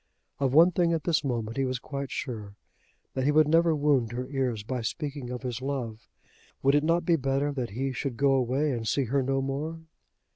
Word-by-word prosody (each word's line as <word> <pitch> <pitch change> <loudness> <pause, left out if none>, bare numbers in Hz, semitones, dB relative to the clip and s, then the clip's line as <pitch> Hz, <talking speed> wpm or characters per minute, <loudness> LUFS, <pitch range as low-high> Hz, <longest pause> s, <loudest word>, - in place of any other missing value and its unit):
Of 135 -2 +1
one 165 +6 +7
thing 170 -1 +2
at 160 - -1
this 165 -3 +1
moment 115 -4 -2
he 135 - +2
was 130 -1 -1
quite 140 +1 -5
sure, 110 -7 -5 0.6
that 130 - -1
he 145 - +3
would 155 0 +5
never 165 +1 +4
wound 140 -6 +2
her 125 +1 -3
ears 125 -6 -1
by 125 +3 -3
speaking 140 +3 -4
of 125 +1 -5
his 125 -1 -4
love. 125 -5 -4 0.6
Would 135 +1 +4
it 145 0 +3
not 165 +2 +2
be 170 -1 +4
better 135 +1 0
that 130 -4 -3
he 135 +1 -1
should 130 -1 -4
go 140 +1 +3
away 135 +3 +1
and 115 -3 -3
see 140 - +1
her 135 +3 +1
no 135 +1 0
more? 150 +5 -3
135 Hz, 215 wpm, -28 LUFS, 125-150 Hz, 0.6 s, one